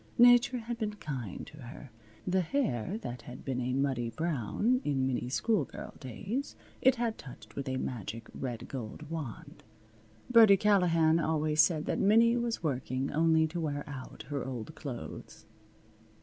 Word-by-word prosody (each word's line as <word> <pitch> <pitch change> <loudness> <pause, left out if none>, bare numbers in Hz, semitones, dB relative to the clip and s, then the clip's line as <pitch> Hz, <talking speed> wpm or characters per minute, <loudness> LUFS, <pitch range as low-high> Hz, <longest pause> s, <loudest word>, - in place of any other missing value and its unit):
Nature 245 +1 +6
had 235 0 -5
been 210 -2 -2
kind 130 - -5
to 150 - -13
her. 130 0 -10 0.3
The 185 0 +2
hair 180 - -1
that 120 0 -5
had 125 +2 -10
been 130 -2 -1
a 125 +1 -1
muddy 130 -3 0
brown 165 - 0
in 135 -3 +1
Minnie's 125 -1 -1
schoolgirl 210 - -1
days 195 - -4 0.3
it 260 0 +5
had 230 -2 -2
touched 125 - -12
with 140 -1 -3
a 130 - -1
magic 115 -3 -5
red 120 -4 -5
gold 135 +5 -7
wand. 150 -9 -6 0.7
Birdie 225 -5 +8
Callahan 170 -6 +4
always 155 -1 +2
said 160 -2 +2
that - - -1
Minnie 230 +4 +5
was 235 -5 -1
working 130 -2 -1
only 160 +1 +4
to 165 +2 -4
wear 145 -2 -2
out 130 -5 -8
her 140 -3 -2
old 130 +2 -5
clothes. 135 -6 -8
150 Hz, 155 wpm, -31 LUFS, 130-205 Hz, 0.7 s, Birdie